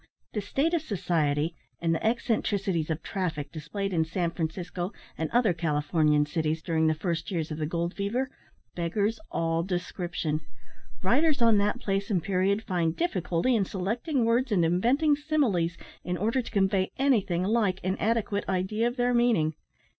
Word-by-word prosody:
The 210 Hz, -, -1 dB
state 275 Hz, -, 0 dB
of 335 Hz, -, +2 dB
society, 165 Hz, -, 0 dB, 0.3 s
and 165 Hz, -1 st, +1 dB
the 165 Hz, -, -2 dB
eccentricities 200 Hz, -7 st, 0 dB
of 160 Hz, 0 st, -2 dB
traffic 160 Hz, -7 st, -3 dB
displayed 195 Hz, +6 st, -4 dB
in 160 Hz, -2 st, +3 dB
San 170 Hz, +1 st, -1 dB
Francisco 175 Hz, +2 st, -3 dB, 0.2 s
and 160 Hz, -, -2 dB
other 235 Hz, -6 st, +3 dB
Californian 150 Hz, -1 st, +2 dB
cities 160 Hz, +1 st, -1 dB
during 160 Hz, -1 st, +2 dB
the 155 Hz, -, +2 dB
first 165 Hz, 0 st, -2 dB
years 165 Hz, -5 st, -2 dB
of 155 Hz, -, -4 dB
the 155 Hz, -, -1 dB
gold 170 Hz, +2 st, -2 dB
fever, 240 Hz, +7 st, -1 dB, 0.4 s
beggars 200 Hz, -, 0 dB
all 165 Hz, 0 st, 0 dB
description. 175 Hz, -3 st, -2 dB, 0.6 s
Writers 280 Hz, -, +3 dB
on 230 Hz, -3 st, +5 dB
that 210 Hz, +5 st, +1 dB
place 195 Hz, -4 st, -1 dB
and 185 Hz, -6 st, +1 dB
period 195 Hz, +3 st, +1 dB
find 175 Hz, -5 st, 0 dB
difficulty 215 Hz, -, +1 dB
in 215 Hz, -, +3 dB
selecting 225 Hz, -, -1 dB
words 235 Hz, +2 st, +2 dB
and 180 Hz, -5 st, +3 dB
inventing 250 Hz, -, +3 dB
similes 265 Hz, -, +1 dB, 0.3 s
in 180 Hz, 0 st, -2 dB
order 225 Hz, +8 st, +1 dB
to -, -, -8 dB
convey 195 Hz, -1 st, +2 dB
anything 205 Hz, -10 st, +2 dB
like 200 Hz, -2 st, +1 dB
an 185 Hz, +1 st, 0 dB
adequate 215 Hz, -2 st, 0 dB
idea 195 Hz, +5 st, +1 dB
of 240 Hz, +2 st, -4 dB
their 245 Hz, 0 st, +2 dB
meaning. 230 Hz, -10 st, +3 dB
185 Hz, 160 wpm, -28 LUFS, 165-225 Hz, 0.6 s, on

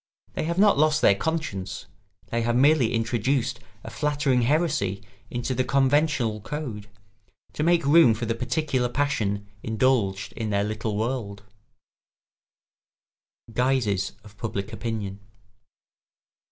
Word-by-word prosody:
They -, -, -2 dB
have 170 Hz, +2 st, -2 dB
not 205 Hz, -4 st, +5 dB
lost 155 Hz, 0 st, +3 dB
their -, -, +7 dB
conscience; 100 Hz, -, -3 dB, 0.5 s
they 115 Hz, -, 0 dB
have 120 Hz, +1 st, 0 dB
merely 135 Hz, -2 st, +4 dB
introduced 120 Hz, +3 st, 0 dB, 0.2 s
a -, -, -8 dB
flattering 145 Hz, -4 st, +1 dB
heresy 115 Hz, -, 0 dB, 0.3 s
into 120 Hz, +2 st, -2 dB
the 130 Hz, +1 st, +1 dB
conventional 135 Hz, -4 st, +1 dB
code, 110 Hz, -5 st, -6 dB, 0.6 s
to -, -, -4 dB
make 170 Hz, -1 st, +3 dB
room 145 Hz, -5 st, +6 dB
for 115 Hz, +2 st, -4 dB
the 115 Hz, -, 0 dB
particular 125 Hz, +1 st, -1 dB
passion 110 Hz, -8 st, -1 dB, 0.2 s
indulged 110 Hz, -4 st, 0 dB
in 110 Hz, -2 st, -4 dB
their 100 Hz, -1 st, +1 dB
little 110 Hz, 0 st, -3 dB
world. 110 Hz, -3 st, -3 dB, 2.0 s
[Sidenote: 110 Hz, -, -16 dB
Guises 125 Hz, -7 st, +1 dB
of 105 Hz, -1 st, -16 dB
public 105 Hz, -1 st, -4 dB
opinion. 110 Hz, -4 st, -4 dB
120 Hz, 125 wpm, -25 LUFS, 105-145 Hz, 2.0 s, their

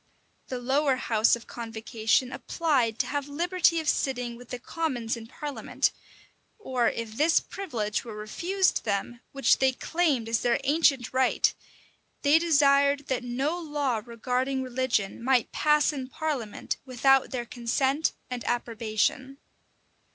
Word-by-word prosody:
[] -, -, -42 dB
The 255 Hz, -, -4 dB
lower 270 Hz, +3 st, +1 dB
house 225 Hz, -3 st, +3 dB
of 235 Hz, -, -11 dB
convocation 225 Hz, +1 st, -1 dB
applied 255 Hz, -5 st, 0 dB
to -, -, +1 dB
have 285 Hz, -1 st, -3 dB
liberty 340 Hz, +2 st, +2 dB
of 315 Hz, -, -5 dB
sitting 245 Hz, -4 st, 0 dB
with 245 Hz, 0 st, -13 dB
the 250 Hz, -, -4 dB
commons 250 Hz, -4 st, -2 dB
in 225 Hz, -1 st, -9 dB
parliament; 285 Hz, +3 st, -2 dB, 0.7 s
or 255 Hz, -, 0 dB
if 230 Hz, -1 st, -5 dB
this 320 Hz, +3 st, +4 dB
privilege 235 Hz, -, -3 dB
were 225 Hz, -3 st, -8 dB
refused 350 Hz, -, 0 dB
them, 210 Hz, +3 st, -2 dB
which 275 Hz, 0 st, +3 dB
they 265 Hz, -1 st, +3 dB
claimed 295 Hz, -6 st, 0 dB
as 230 Hz, 0 st, 0 dB
their 240 Hz, -1 st, +2 dB
ancient 275 Hz, -4 st, +2 dB
right, 260 Hz, -1 st, +2 dB, 0.7 s
they 290 Hz, +3 st, +5 dB
desired 280 Hz, -3 st, +3 dB
that 260 Hz, -2 st, -1 dB
no 270 Hz, +8 st, -1 dB
law 290 Hz, -8 st, -1 dB
regarding 255 Hz, +3 st, -2 dB
religion 245 Hz, -5 st, -1 dB
might 255 Hz, -2 st, +2 dB
pass 300 Hz, 0 st, +3 dB
in 265 Hz, -3 st, -5 dB
parliament 270 Hz, -7 st, -3 dB
without 270 Hz, +1 st, +3 dB
their 245 Hz, -2 st, -3 dB
consent 265 Hz, +6 st, 0 dB
and 245 Hz, -2 st, -5 dB
approbation. 235 Hz, +3 st, -1 dB
260 Hz, 140 wpm, -27 LUFS, 235-290 Hz, 0.7 s, they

